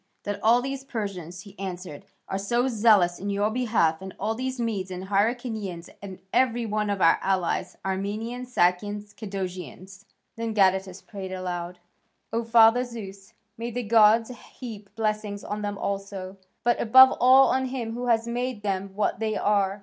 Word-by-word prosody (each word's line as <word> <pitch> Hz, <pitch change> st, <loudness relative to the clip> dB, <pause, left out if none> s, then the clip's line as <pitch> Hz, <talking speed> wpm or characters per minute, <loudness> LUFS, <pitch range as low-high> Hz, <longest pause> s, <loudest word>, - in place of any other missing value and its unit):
"That 205 Hz, 0 st, -3 dB
all 235 Hz, +3 st, +4 dB
these 270 Hz, 0 st, -4 dB
Persians," 195 Hz, -9 st, -5 dB
he 200 Hz, 0 st, -13 dB
answered, 180 Hz, -5 st, -6 dB, 0.2 s
"are 195 Hz, -, -3 dB
so 240 Hz, +6 st, +1 dB
zealous 210 Hz, -7 st, +3 dB
in 200 Hz, -, -4 dB
your 205 Hz, +2 st, 0 dB
behalf, 215 Hz, -10 st, +1 dB
and 190 Hz, 0 st, -8 dB
all 215 Hz, +2 st, -1 dB
these 255 Hz, +2 st, -4 dB
Medes 210 Hz, -5 st, -2 dB
and 185 Hz, +1 st, -7 dB
Hyrcanians, 205 Hz, -4 st, -1 dB
and 190 Hz, -2 st, -8 dB, 0.2 s
every 240 Hz, -2 st, +2 dB
one 210 Hz, -1 st, -1 dB
of 200 Hz, -2 st, -2 dB
our 165 Hz, -, +5 dB
allies, 185 Hz, -1 st, -1 dB
Armenians, 215 Hz, +6 st, -3 dB
Sakians, 205 Hz, +2 st, 0 dB
Cadousians." 190 Hz, -1 st, -7 dB, 0.3 s
Then 225 Hz, -1 st, -3 dB
Gadatas 190 Hz, -1 st, +2 dB
prayed 195 Hz, -3 st, -7 dB
aloud: 180 Hz, -1 st, -4 dB, 0.6 s
"O 230 Hz, +1 st, 0 dB
Father 230 Hz, +1 st, +5 dB
Zeus, 205 Hz, -4 st, -9 dB, 0.3 s
may 235 Hz, +1 st, -3 dB
the 245 Hz, +1 st, -3 dB
gods 225 Hz, +1 st, +5 dB, 0.2 s
heap 215 Hz, -5 st, -8 dB
blessings 215 Hz, -2 st, -2 dB
on 210 Hz, +1 st, -4 dB
them 205 Hz, -1 st, -3 dB
also, 195 Hz, -1 st, -4 dB, 0.3 s
but 240 Hz, 0 st, +2 dB
above 260 Hz, +3 st, +8 dB
all 260 Hz, +2 st, +7 dB
on 260 Hz, 0 st, +1 dB
him 250 Hz, -3 st, -4 dB
who 245 Hz, +1 st, -4 dB
has 230 Hz, -1 st, +2 dB
made 245 Hz, -2 st, -3 dB
them 195 Hz, -1 st, -3 dB
what 205 Hz, -1 st, 0 dB
they 220 Hz, -1 st, -1 dB
are! 200 Hz, -1 st, +1 dB
205 Hz, 165 wpm, -26 LUFS, 190-230 Hz, 0.6 s, above